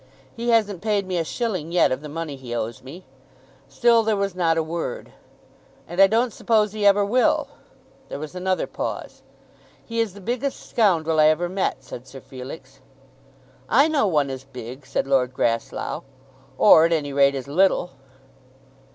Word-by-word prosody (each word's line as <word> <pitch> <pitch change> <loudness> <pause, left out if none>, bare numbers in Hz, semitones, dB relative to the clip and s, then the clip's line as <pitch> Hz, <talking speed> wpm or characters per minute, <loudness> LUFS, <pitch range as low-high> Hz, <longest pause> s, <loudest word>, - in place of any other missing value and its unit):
"He 235 +1 -3
hasn't 210 -6 +2
paid 210 -2 0
me 185 -2 -2
a - - 0
shilling 185 -4 -3
yet 175 - +3
of 130 +2 -2
the 150 - -8
money 155 -1 -5
he 125 -3 -7
owes 115 0 -4
me." 165 +8 -11 0.6
Still 230 - +4
there 220 -1 +1
was 200 -1 -1
not 165 -3 +1
a 160 - +1
word. 165 +1 -5 0.8
"And 175 +3 0
I 195 - +9
don't 230 +2 +1
suppose 215 -3 +1
he 210 -1 +1
ever 200 0 +4
will." 245 +5 +2 0.6
There - - -5
was 155 +2 -7
another 185 0 -1
pause. - - -6 0.6
"He 230 0 -4
is 220 -4 -1
the - - -10
biggest 250 +7 -4
scoundrel 165 -8 +2
I 155 - +6
ever 155 +3 +2
met," 190 +2 -2
said 125 +1 -10
Sir 135 +1 -10
Felix. 130 +4 -10 0.9
"I 280 - +5
know 295 -8 +1
one 150 -6 +1
as 130 0 -7
big," 130 0 -10
said 135 - -1
Lord 130 -2 +1
Grasslough, 115 -2 -2 0.6
"or, 160 -6 +7
at 170 - +1
any 145 -3 -2
rate, 140 0 +4
as 135 0 -5
little." 180 +3 +2
170 Hz, 175 wpm, -23 LUFS, 140-205 Hz, 0.9 s, I